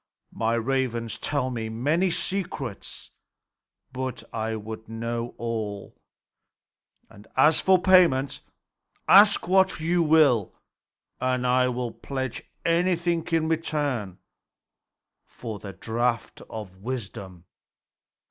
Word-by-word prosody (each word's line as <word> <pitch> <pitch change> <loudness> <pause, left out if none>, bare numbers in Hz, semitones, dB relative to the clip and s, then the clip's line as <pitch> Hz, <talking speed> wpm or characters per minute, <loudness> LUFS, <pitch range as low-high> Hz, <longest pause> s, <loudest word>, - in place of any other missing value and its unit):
My 115 +1 0
ravens 120 -1 -1
tell 140 -3 -1
me 115 -2 -4
many 150 +11 +1
secrets; 170 - -4 0.8
but 130 -3 -4
I 110 0 -2
would 110 +1 -8
know 115 +1 -4
all. 110 -4 -4 1.1
And 100 +1 -16
as 150 +4 +5
for 190 -1 +5
payment, 175 -8 +4 0.7
ask 205 -1 +7
what 190 -1 +3
you 170 +2 +1
will, 150 - +4 0.6
and 130 0 0
I 125 +1 +3
will 125 -1 -2
pledge 130 -1 -5 0.2
anything 170 0 +1
in 165 -1 +2
return 145 - -2 1.1
for 110 -4 -8
the 100 - -8
draught 115 +3 -2
of 105 -4 -8
wisdom." 95 -6 -7
125 Hz, 100 wpm, -26 LUFS, 115-160 Hz, 1.1 s, ask